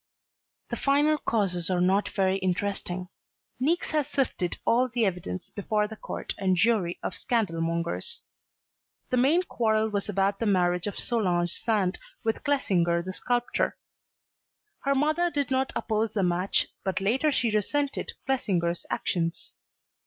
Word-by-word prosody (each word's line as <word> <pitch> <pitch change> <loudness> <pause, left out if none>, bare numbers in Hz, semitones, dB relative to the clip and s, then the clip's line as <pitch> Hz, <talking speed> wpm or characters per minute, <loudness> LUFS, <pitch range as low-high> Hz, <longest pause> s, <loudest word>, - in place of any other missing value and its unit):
The - - 0
final 295 +2 +3
causes 190 -9 0
are 180 -1 +1
not 190 +3 +2
very 190 -1 +1
interesting. 185 -1 -2 0.5
Niecks 320 +7 +1
has 300 -3 +1
sifted 255 - -1
all 245 +2 +4
the 230 -1 +1
evidence 175 - -3
before 210 +1 0
the 220 - -8
court - - -5
and 185 -2 +2
jury 195 -4 +2
of - - -2
scandal 205 -9 0
mongers. 170 - -1 0.9
The 250 - +2
main 295 +9 +4
quarrel 220 -8 +1
was 205 -1 -2
about 195 0 +1
the 230 - 0
marriage 180 -2 +2
of 205 - -4
Solange 180 -7 +1
Sand 200 -5 0 0.2
with 225 -1 -1
Clesinger 175 - +2
the 185 +1 -5
sculptor. 245 +4 0 1.1
Her 275 0 +3
mother 310 +5 +2
did 285 -5 -2
not 265 0 +1
oppose 220 0 0
the 200 - +1
match, 180 +2 +2 0.2
but 190 -1 -1
later 250 +10 +2
she 245 -4 +1
resented 275 +7 -1
Clesinger's 180 -10 0
actions. 165 -2 -2
210 Hz, 145 wpm, -27 LUFS, 180-255 Hz, 1.1 s, all